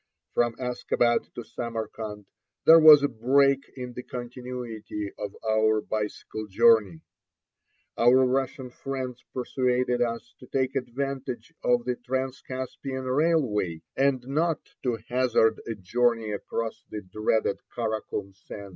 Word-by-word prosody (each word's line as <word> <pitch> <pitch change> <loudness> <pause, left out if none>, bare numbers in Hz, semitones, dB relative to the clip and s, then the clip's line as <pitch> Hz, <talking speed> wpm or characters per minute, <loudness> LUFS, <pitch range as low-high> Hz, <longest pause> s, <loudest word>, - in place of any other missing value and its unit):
From 120 -1 +1
Askabad 120 -1 0
to 120 - -5
Samarkand 110 -3 -5 0.4
there 165 +1 +9
was 155 -2 +9
a - - +4
break 135 +3 +3
in 125 -2 -6
the 125 - -6
continuity 120 -4 -6
of 105 -1 -5
our 110 0 +3
bicycle 110 0 -4
journey. 100 -4 +4 1.0
Our 125 +2 +6
Russian 130 0 -1
friends 130 -2 -5
persuaded 125 -1 0
us 115 0 -2
to 125 - -13
take 130 +1 -1
advantage 135 0 -4
of 120 -1 +2
the 125 -1 -1
Transcaspian 130 0 -4
railway, 125 - +1
and 135 -2 +2
not 160 +3 0
to 120 -3 0
hazard 120 -3 +2
a 115 - -3
journey 115 +3 +1
across 110 +2 -4
the 105 -1 -6
dreaded 110 +2 0 0.2
Kara 110 -2 -1
Kum 100 -1 -6
sands. 100 +1 -10
120 Hz, 125 wpm, -27 LUFS, 110-130 Hz, 1.0 s, there